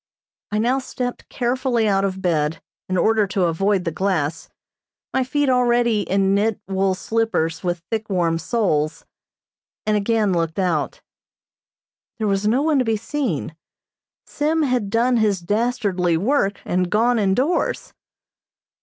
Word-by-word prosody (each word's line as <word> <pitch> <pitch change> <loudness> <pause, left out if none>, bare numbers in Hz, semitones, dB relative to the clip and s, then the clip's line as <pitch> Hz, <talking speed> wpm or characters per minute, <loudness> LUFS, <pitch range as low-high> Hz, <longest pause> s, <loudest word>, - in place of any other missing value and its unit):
I 210 - 0
now 245 +5 +2
stepped 250 -1 -5
carefully 245 -2 0
out 195 -1 +2
of 190 -1 -2
bed, 160 -3 0 0.3
in 185 - 0
order 215 +2 +3
to 190 0 0
avoid 190 +3 +1
the 165 - -2
glass, 165 -4 -1 0.6
my 265 - +2
feet 275 +3 -1
being - - +1
already 240 -3 +2
in 195 0 +1
knit, 210 +2 +1
wool 190 0 +1
slippers, 210 -6 -1
with 175 -2 -2
thick, 220 -1 -2
warm 170 -4 +1
soles 165 -6 -1 0.8
and 215 - +2
again 210 -1 +1
looked 165 -2 -1
out. 175 -6 -1 1.2
There 220 - -2
was 200 0 +1
no 250 +6 +2
one 310 -3 +2
to - - +3
be 225 -1 +1
seen. 220 - -3 0.7
Sim 310 +2 0
had 250 -7 0
done 235 +3 +2
his 210 -4 +2
dastardly 200 -3 0
work, 200 - 0
and 180 0 0
gone 230 +3 +2
indoors. 250 - 0
205 Hz, 145 wpm, -21 LUFS, 185-240 Hz, 1.2 s, order